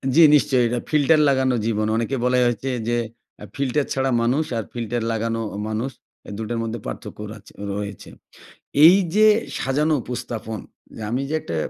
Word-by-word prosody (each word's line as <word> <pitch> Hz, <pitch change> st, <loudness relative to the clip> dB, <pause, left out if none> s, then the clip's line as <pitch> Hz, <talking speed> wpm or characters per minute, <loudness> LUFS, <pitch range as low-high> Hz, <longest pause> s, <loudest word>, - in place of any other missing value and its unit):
জি, 170 Hz, -, +7 dB
নিশ্চয়ই 135 Hz, -4 st, +3 dB
এটা 120 Hz, +1 st, -1 dB
ফিল্টার 155 Hz, +1 st, +4 dB
লাগানো 130 Hz, -2 st, +2 dB
জীবন, 110 Hz, -1 st, 0 dB
অনেকে 115 Hz, +4 st, -1 dB
বলে 125 Hz, 0 st, +3 dB
হচ্ছে 120 Hz, +3 st, -2 dB, 0.2 s
যে 120 Hz, -, +1 dB, 0.5 s
আ -, -, -6 dB
ফিল্টার 140 Hz, +1 st, 0 dB
ছাড়া 135 Hz, 0 st, 0 dB
মানুষ 125 Hz, +7 st, +2 dB
আর 115 Hz, -, -2 dB
ফিল্টার 120 Hz, 0 st, -3 dB
লাগানো 115 Hz, 0 st, -1 dB, 0.2 s
অ -, -, -5 dB
মানুষ 115 Hz, +5 st, -2 dB, 0.4 s
এ -, -, -8 dB
২ 110 Hz, -, -4 dB
টার 120 Hz, -1 st, -2 dB
মধ্যে 115 Hz, +1 st, -4 dB
পার্থক্য -, -, -7 dB
রাচে 105 Hz, -2 st, -15 dB, 0.2 s
রয়েছে। 100 Hz, -1 st, -6 dB, 0.8 s
এই 175 Hz, +4 st, +9 dB, 0.2 s
যে 215 Hz, +1 st, +6 dB, 0.3 s
সাজানো 150 Hz, +4 st, +1 dB
উপস্থাপন, 115 Hz, -3 st, -5 dB, 0.4 s
যে -, -, -8 dB
আমি 125 Hz, +3 st, 0 dB
যে 155 Hz, -, -1 dB
একটা, 85 Hz, -, -5 dB
120 Hz, 175 wpm, -22 LUFS, 115-135 Hz, 0.8 s, এই